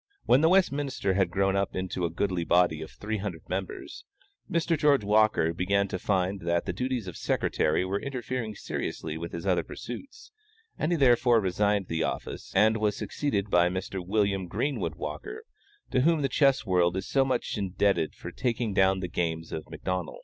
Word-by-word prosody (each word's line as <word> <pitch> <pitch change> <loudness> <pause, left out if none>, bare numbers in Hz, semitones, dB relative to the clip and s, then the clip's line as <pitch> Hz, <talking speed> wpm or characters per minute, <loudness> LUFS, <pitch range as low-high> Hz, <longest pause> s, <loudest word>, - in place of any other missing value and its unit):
When 130 - +5
the 160 - +5
Westminster 145 - +2
had 95 -2 +2
grown 95 +2 +1
up 100 0 -1
into 95 -1 -2
a - - 0
goodly 90 +1 -1
body 85 -2 +3
of 80 - -7
three 110 +1 -4
hundred 95 -5 -6
members, 95 +1 -5 0.5
Mr. 170 0 +1
George 145 -6 +3
Walker 105 -5 +3
began 100 +3 +1
to 95 - -3
find 95 0 0
that 85 0 0
the - - -2
duties 125 -3 -2
of 90 -3 -7
secretary 80 +4 0
were 100 +2 -2
interfering 125 -4 -4
seriously 80 -5 -4
with 85 +1 -5
his 85 - -6
other - - +2
pursuits, 280 - -9 0.4
and 155 - -1
he - - +3
therefore 120 -3 +5
resigned 100 +1 +1
the 80 0 -2
office, - - -4
and 110 +3 +5
was 105 -1 0
succeeded 105 -9 -2
by 90 0 +5
Mr. 95 0 -4
William 100 -1 0
Greenwood 140 +10 -2
Walker, 425 +2 -6 0.5
to 130 - +3
whom 160 +1 +3
the 135 - +1
chess 135 -3 +3
world 90 -2 +2
is 95 - -4
so 135 - +3
much 130 -1 -1
indebted 100 -4 0
for 85 - -8
taking 115 +1 -1
down 95 -1 +3
the 90 - -2
games 80 -2 -2
of 80 - -5
McDonnel. 90 -2 -4
100 Hz, 185 wpm, -28 LUFS, 90-125 Hz, 0.5 s, When